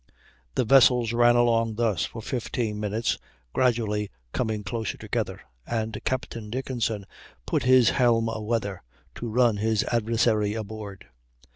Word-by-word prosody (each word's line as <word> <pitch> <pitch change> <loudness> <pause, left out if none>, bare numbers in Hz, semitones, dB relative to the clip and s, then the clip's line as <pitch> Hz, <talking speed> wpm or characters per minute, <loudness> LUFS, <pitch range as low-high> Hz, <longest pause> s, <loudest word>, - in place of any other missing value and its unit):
The 125 - +1
vessels 120 -2 +5
ran 120 0 +5
along 115 -2 +2
thus 110 -6 +1
for 115 - -8
15 115 -3 -3
minutes, 105 +2 -1 0.3
gradually 110 -5 +1 0.2
coming 110 -4 -2
closer 110 +2 -3
together, - - -3 0.3
and 110 -1 -3
Captain 115 -4 -3
Dickenson 115 -4 -2 0.4
put - - 0
his 130 -2 +6
helm 115 -3 +3
aweather, 110 -3 -2 0.3
to 120 - -5
run 120 -1 +3
his 110 +1 +1
adversary 110 -2 +1
aboard. 105 -2 -7
115 Hz, 125 wpm, -26 LUFS, 105-120 Hz, 0.4 s, his